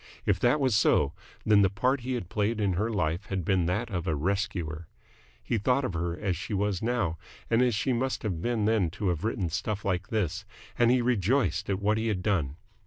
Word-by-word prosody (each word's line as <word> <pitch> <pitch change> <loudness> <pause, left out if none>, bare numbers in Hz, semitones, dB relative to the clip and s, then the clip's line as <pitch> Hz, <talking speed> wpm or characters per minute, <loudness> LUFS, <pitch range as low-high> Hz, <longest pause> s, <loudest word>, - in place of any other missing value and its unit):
If 95 -2 +2
that 120 +8 +3
was 130 -5 +2
so, 70 -7 +3 0.3
then 105 -1 +5
the 95 - +4
part 130 +8 +1
he 130 +1 -3
had 105 -8 -4
played 105 +3 -1
in 100 -3 +1
her 105 +6 0
life 90 -2 -1
had 95 -4 -3
been 90 -3 +2
that 105 +6 -1
of 90 -1 -3
a 80 - +1
rescuer. 85 -2 -2 0.6
He 110 - 0
thought 130 +5 +2
of 95 - -3
her 85 +1 -2
as 100 -4 -1
she 90 +5 -4
was 100 -2 0
now 110 -9 -1 0.3
and 115 +1 +4
as 125 -3 +3
she 125 +5 0
must 130 +2 -1
have 90 -7 -2
been 115 -1 0
then 105 -5 +2
to 100 - 0
have 85 0 -2
written 105 -5 -1
stuff 100 +4 -3
like 90 -1 -1
this, 100 -2 -1 0.3
and 120 -1 +4
he 125 0 +3
rejoiced 120 +2 +1
at 95 -1 0
what 105 +2 +2
he 115 - -1
had 95 -5 -1
done. 80 -10 0
100 Hz, 225 wpm, -28 LUFS, 90-115 Hz, 0.6 s, then